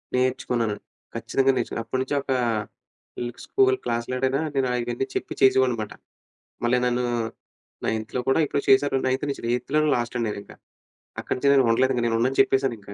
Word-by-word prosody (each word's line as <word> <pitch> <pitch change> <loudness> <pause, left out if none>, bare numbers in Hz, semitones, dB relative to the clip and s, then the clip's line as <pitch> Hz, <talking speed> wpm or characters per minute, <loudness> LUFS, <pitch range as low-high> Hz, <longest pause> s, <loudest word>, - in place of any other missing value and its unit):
నేర్చుకున్నాను. 125 -4 0 0.4
ఖచ్చితంగా 135 0 +2
నేర్చుకున్నాను. 115 -1 -3
అప్పటినుంచి 130 +2 -1
ఒక 135 - -5 0.9
ఇల్ 120 0 -3
స్కూల్ 395 -1 +3
క్లాస్‌లోడనైనా 130 +4 -1
నేను 135 -1 +2
ఆయన్నీ 120 +1 -2
చెప్పి - - -3
చేసేవాడినన్నమాట. 125 -5 +3 0.7
మళ్ళీ 125 +1 +3
నన్ను 125 0 0 0.8
నైన్త్‌లో 110 +3 -2
కూడా 135 - +4
ఇప్పుడు 140 - -1
చేసారు. 135 +1 +4
9త్ 130 +3 0
నుంచి - - -5
ఎయిత్‌లోనే 150 +5 +1
లాస్ట్ 120 +1 -3
అండి 115 - 0
నేనింకా. 100 -1 -8 0.7
అక్కడినుంచి 140 +2 0
నేను 135 -2 +5
ఉండలేదు. 130 +3 +3
ఇంగా 120 - 0
నేను 115 0 +1
ఉండనని 130 +3 0
చెప్పేసాను 135 -2 +1
ఇంకా 100 0 -11
130 Hz, 150 wpm, -24 LUFS, 120-135 Hz, 0.9 s, నేను